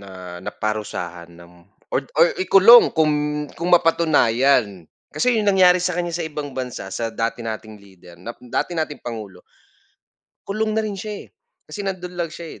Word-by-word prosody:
na 90 Hz, -2 st, -10 dB
naparusahan 90 Hz, -4 st, -5 dB
ng 85 Hz, 0 st, -16 dB, 0.4 s
or 135 Hz, -, -1 dB
or 165 Hz, +3 st, +6 dB
ikulong 195 Hz, +6 st, +7 dB
kung 150 Hz, -1 st, 0 dB
kung 170 Hz, +2 st, -2 dB
mapatunayan. 135 Hz, -, +3 dB, 0.2 s
Kasi 245 Hz, -3 st, +1 dB
yung 210 Hz, -, 0 dB
nangyari 185 Hz, -2 st, +5 dB
sa 180 Hz, -1 st, -1 dB
kanya 175 Hz, -1 st, -2 dB
sa 170 Hz, -, -2 dB
ibang 150 Hz, -3 st, -6 dB
bansa 125 Hz, -7 st, -6 dB
sa 115 Hz, -, -2 dB
dati 115 Hz, +1 st, -3 dB
nating 110 Hz, -2 st, -7 dB
leader 95 Hz, -3 st, -17 dB
na 90 Hz, +7 st, -9 dB, 0.2 s
dati 170 Hz, +8 st, -2 dB
nating 155 Hz, -2 st, -3 dB
pangulo, 105 Hz, -6 st, -8 dB, 1.0 s
kulong 215 Hz, +2 st, -2 dB
na 220 Hz, -, +1 dB
rin 210 Hz, -2 st, -4 dB
siya, 205 Hz, +1 st, -7 dB
eh, -, -, -26 dB, 0.4 s
kasi 210 Hz, -, -8 dB
nando'n 185 Hz, -2 st, -5 dB
lang 170 Hz, -1 st, -2 dB
siya, 165 Hz, 0 st, -10 dB
150 Hz, 160 wpm, -21 LUFS, 105-180 Hz, 1.0 s, ikulong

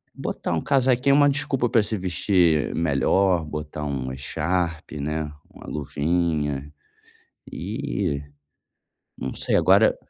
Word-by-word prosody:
Botar -, -, -3 dB
um -, -, 0 dB
casaquinho 135 Hz, 0 st, +3 dB
é 140 Hz, -, +5 dB
uma 145 Hz, 0 st, +6 dB
desculpa 135 Hz, -3 st, 0 dB
pra 110 Hz, -2 st, +4 dB
se 110 Hz, +1 st, -2 dB
vestir 90 Hz, -4 st, +2 dB
melhor, 85 Hz, +3 st, +2 dB
botar 75 Hz, 0 st, -5 dB
uma 65 Hz, -3 st, -3 dB
echarpe, 80 Hz, +1 st, -2 dB
né, 75 Hz, +1 st, -2 dB, 0.2 s
uma -, -, -13 dB
luvinha 75 Hz, -1 st, -1 dB, 0.8 s
e 70 Hz, +4 st, -3 dB, 1.0 s
não 65 Hz, +1 st, -4 dB
sei -, -, +1 dB
agora -, -, +5 dB
80 Hz, 120 wpm, -24 LUFS, 75-95 Hz, 1.0 s, uma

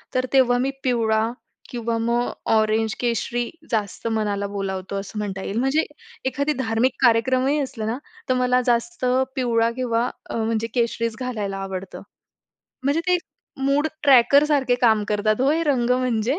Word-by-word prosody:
तर 255 Hz, -, +2 dB
तेव्हा 250 Hz, -2 st, +5 dB
मी 270 Hz, +2 st, 0 dB
पिवळा 225 Hz, -3 st, +1 dB, 0.4 s
किंवा 235 Hz, -1 st, -2 dB
मग 235 Hz, +1 st, 0 dB, 0.2 s
ऑरेंज, 220 Hz, 0 st, +2 dB
केशरी 240 Hz, 0 st, -1 dB, 0.2 s
जास्त 215 Hz, -1 st, -2 dB
मनाला 210 Hz, -3 st, -1 dB
बोलावतो, 195 Hz, -1 st, -4 dB
असं 200 Hz, +2 st, -6 dB
म्हणता 195 Hz, -2 st, -4 dB
येईल. 200 Hz, -, -4 dB
म्हणजे 270 Hz, +5 st, +2 dB, 0.4 s
एखादी 280 Hz, +3 st, 0 dB
धार्मिक 225 Hz, +2 st, +1 dB
कार्यक्रमही 255 Hz, +5 st, +3 dB
असलं 245 Hz, -5 st, -4 dB
ना, 230 Hz, -, -1 dB, 0.3 s
तर -, -, +4 dB
मला 250 Hz, 0 st, +2 dB
जास्त 250 Hz, +6 st, 0 dB, 0.3 s
पिवळा 235 Hz, -3 st, +1 dB
किंवा 245 Hz, -1 st, 0 dB, 0.2 s
अ, -, -, -4 dB
म्हणजे 225 Hz, 0 st, -1 dB
केशरीच 230 Hz, -1 st, 0 dB
घालायला 215 Hz, -6 st, -3 dB
आवडतं. 190 Hz, -1 st, -6 dB, 0.8 s
म्हणजे 285 Hz, +4 st, +2 dB
ते 360 Hz, -, +5 dB, 0.5 s
मूड 285 Hz, +3 st, +2 dB, 0.2 s
ट्रॅकरसारखे 275 Hz, 0 st, +5 dB
काम 220 Hz, -3 st, +4 dB
करतात, 215 Hz, +2 st, +1 dB
हो, 270 Hz, -, +3 dB
हे 325 Hz, +2 st, +1 dB
रंग 250 Hz, -5 st, +1 dB
म्हणजे. 250 Hz, +2 st, +1 dB
235 Hz, 145 wpm, -23 LUFS, 220-255 Hz, 0.8 s, तेव्हा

